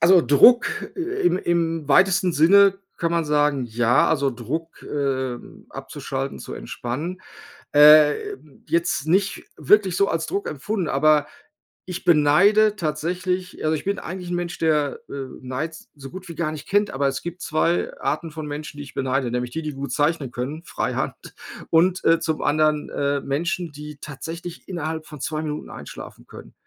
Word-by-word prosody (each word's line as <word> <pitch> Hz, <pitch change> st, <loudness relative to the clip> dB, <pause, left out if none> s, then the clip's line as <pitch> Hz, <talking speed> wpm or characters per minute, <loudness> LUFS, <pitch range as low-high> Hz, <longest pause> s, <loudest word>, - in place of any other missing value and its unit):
also 180 Hz, +2 st, +6 dB
Druck 240 Hz, -, +5 dB
im 360 Hz, -, 0 dB
im 165 Hz, -4 st, -1 dB
weitesten 185 Hz, +4 st, +4 dB
Sinne 195 Hz, +5 st, +5 dB, 0.2 s
kann 170 Hz, 0 st, -1 dB
man 170 Hz, -1 st, +1 dB
sagen, 150 Hz, -3 st, +1 dB
ja, 120 Hz, +2 st, +2 dB
also 140 Hz, -1 st, +1 dB
Druck, 160 Hz, +7 st, -6 dB
äh, 130 Hz, -3 st, -2 dB, 0.3 s
abzuschalten, -, -, -5 dB
zu -, -, -8 dB
entspannen, 155 Hz, +10 st, -5 dB, 0.5 s
ähm, 150 Hz, -1 st, +5 dB
jetzt 170 Hz, -2 st, 0 dB
nicht 195 Hz, +4 st, +1 dB
wirklich 195 Hz, -4 st, +3 dB
so 200 Hz, 0 st, +3 dB
als 165 Hz, -3 st, -2 dB
Druck 200 Hz, -, -2 dB
empfunden. 170 Hz, +5 st, -3 dB
Aber 150 Hz, +1 st, +3 dB, 0.6 s
ich 180 Hz, -2 st, -6 dB
beneide 195 Hz, +8 st, +5 dB
tatsächlich 180 Hz, +3 st, -3 dB
also, 155 Hz, -, +2 dB
ich 150 Hz, -, -5 dB
bin 200 Hz, +1 st, -1 dB
eigentlich 180 Hz, 0 st, -7 dB
'n -, -, 0 dB
Mensch, 175 Hz, 0 st, -3 dB
der, 150 Hz, -3 st, +1 dB
äh, -, -, -8 dB, 0.3 s
Neid 130 Hz, +6 st, -4 dB
s 155 Hz, -, -14 dB
so 135 Hz, -2 st, -10 dB
gut 185 Hz, -1 st, -9 dB
wie 170 Hz, -, -7 dB
gar 155 Hz, -2 st, -1 dB
nicht 155 Hz, -, -9 dB
kennt. 205 Hz, +1 st, +2 dB
Aber 140 Hz, +1 st, 0 dB
es 135 Hz, -, -4 dB
gibt 175 Hz, +1 st, -7 dB
2 165 Hz, +2 st, 0 dB
Arten 165 Hz, -2 st, -2 dB
von 155 Hz, -1 st, -6 dB
Menschen, 150 Hz, 0 st, -6 dB
die 145 Hz, -, -6 dB
ich 140 Hz, -, -13 dB
beneide, 130 Hz, -1 st, -1 dB
nämlich 125 Hz, 0 st, -2 dB
die, 160 Hz, -, -4 dB
die 150 Hz, -1 st, -4 dB
gut 140 Hz, +1 st, -6 dB
zeichnen 145 Hz, -3 st, 0 dB
können, 140 Hz, +7 st, -5 dB
freihand -, -, -2 dB, 0.5 s
und 175 Hz, +3 st, +3 dB, 0.2 s
zum 160 Hz, -1 st, -2 dB
anderen, 150 Hz, +1 st, +1 dB
äh, 140 Hz, 0 st, -1 dB
Menschen, 170 Hz, +4 st, -2 dB
die 150 Hz, 0 st, -9 dB
tatsächlich 165 Hz, +4 st, -8 dB
innerhalb 160 Hz, -3 st, -4 dB
von 150 Hz, -, -10 dB
2 155 Hz, +1 st, -2 dB
Minuten 150 Hz, -1 st, -5 dB
einschlafen -, -, -10 dB
können. -, -, -13 dB
155 Hz, 165 wpm, -23 LUFS, 145-175 Hz, 0.6 s, also